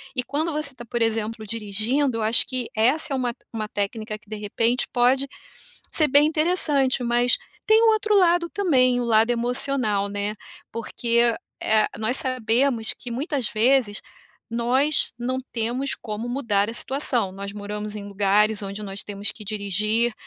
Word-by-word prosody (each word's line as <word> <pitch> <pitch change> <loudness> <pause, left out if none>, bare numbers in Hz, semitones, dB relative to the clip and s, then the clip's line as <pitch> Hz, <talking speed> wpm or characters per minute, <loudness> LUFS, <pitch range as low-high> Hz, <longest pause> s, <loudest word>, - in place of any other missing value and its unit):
e 250 - 0
quando 310 +5 -2
você 295 -3 -3
tá, 240 -2 -11
por 235 +1 -4
exemplo, 225 -1 -1
dirigindo, 230 +5 0
eu 225 - -2
acho 220 +2 +5
que 255 -3 -3
essa 255 +8 +2
é - - +1
uma 245 -2 -1
te - - -35
uma 215 -1 -3
técnica 215 +1 -4
que 210 - -26
de 215 - -5
repente 230 +4 -1
pode 260 +3 +2 0.7
ser 310 -2 +6
bem 285 +2 +5
interessante, 305 -5 +2
mas 240 +1 +3 0.3
tem 440 +1 +5
um - - +5
outro 435 -1 +2
lado 345 -2 +3
também, 255 -10 +2
o - - -1
lado 225 -1 +3
emocional, 240 -3 0
né, 205 +1 -3 0.4
porque, 235 0 0 0.3
eh, 215 0 +3
nós 220 +4 0
sabemos 250 -2 +1
que 245 - -9
muitas 270 -1 -1
vezes 230 -1 +1 0.5
nós 255 +6 +2
não 255 +2 -2
temos 240 +4 -2
como 220 +1 -6
mudar 225 -6 0
a 230 - -5
situação, 245 -8 0
nós 200 +1 -6
moramos 210 +1 -6
em 200 - -8
lugares 205 +1 +2
onde 200 +1 -6
nós 195 -1 -3
temos 205 0 -2
que 215 - -11
dirigir, 215 +3 0
235 Hz, 165 wpm, -23 LUFS, 215-265 Hz, 0.7 s, ser